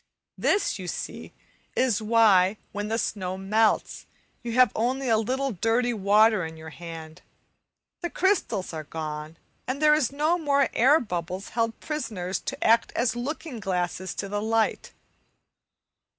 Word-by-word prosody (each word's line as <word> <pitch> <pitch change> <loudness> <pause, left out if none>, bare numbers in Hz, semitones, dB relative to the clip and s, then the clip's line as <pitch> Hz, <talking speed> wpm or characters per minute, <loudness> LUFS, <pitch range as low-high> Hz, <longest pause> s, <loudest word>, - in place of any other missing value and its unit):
This, 395 - +1
you 185 - -6
see, - - -6 0.4
is 245 -5 +2
why, 210 -3 +4
when 205 0 -4
the 225 +1 -1
snow 185 -5 -2
melts, 210 +3 +1 0.3
you 235 -2 -4
have 250 -2 +5
only 255 +4 0
a 225 - +5
little 260 +5 0
dirty 230 +5 +1
water 210 0 +4
in 160 0 -7
your 160 0 -10
hand; 165 0 -9 0.8
the 345 - -2
crystals 335 - 0
are 155 -1 -5
gone 155 +1 -6 0.3
and 260 +2 -2
there 305 0 +5
are 305 - +1
no 305 +5 +1
more 280 -4 +2
air 275 +7 +5
bubbles 180 - -4
held 230 -1 -1
prisoners 215 - -3
to - - -5
act 230 +1 +4
as 235 0 +1
looking 275 +1 -5
glasses 185 -1 -2
to 200 - -4
the 205 +1 -2
light. 225 0 0
220 Hz, 150 wpm, -26 LUFS, 185-255 Hz, 0.8 s, have